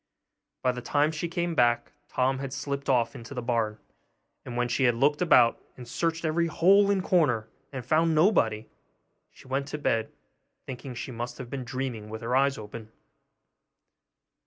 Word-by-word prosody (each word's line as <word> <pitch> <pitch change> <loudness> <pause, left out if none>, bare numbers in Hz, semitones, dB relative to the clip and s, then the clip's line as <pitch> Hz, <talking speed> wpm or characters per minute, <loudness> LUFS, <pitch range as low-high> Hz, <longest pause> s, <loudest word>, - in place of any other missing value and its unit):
By 125 - +3
the 125 0 -6
time 145 +5 +1
she 160 +2 -3
came 170 0 -2
back, 120 -5 +2 0.2
Tom 130 +1 0
had 135 -1 -5
slipped 140 0 -4
off 125 -3 +2
into 120 +4 -9
the 125 - -3
barn; 115 -3 0 0.7
and 120 - -6
when 120 0 +1
she 125 +2 +1
had 120 -1 +3
looked 145 +6 +2
about 125 -9 +5 0.2
and 125 -2 -10
searched 165 +6 -1
every 170 +2 +1
hole 195 +5 +4
and 195 -2 +1
corner, 125 -13 +2 0.2
and 130 -4 -6
found 160 +4 +2
nobody, 115 - +3 0.6
she - - -18
went 135 +1 -2
to 150 - -4
bed, 115 -6 0 0.5
thinking 130 0 -7
she 130 - -6
must 120 +1 -5
have 125 -3 -8
been 135 -2 -4
dreaming 125 -4 -4
with 110 +1 -7
her 120 +2 0
eyes 135 +1 +3
open. 110 +1 -9
130 Hz, 175 wpm, -27 LUFS, 120-155 Hz, 0.7 s, about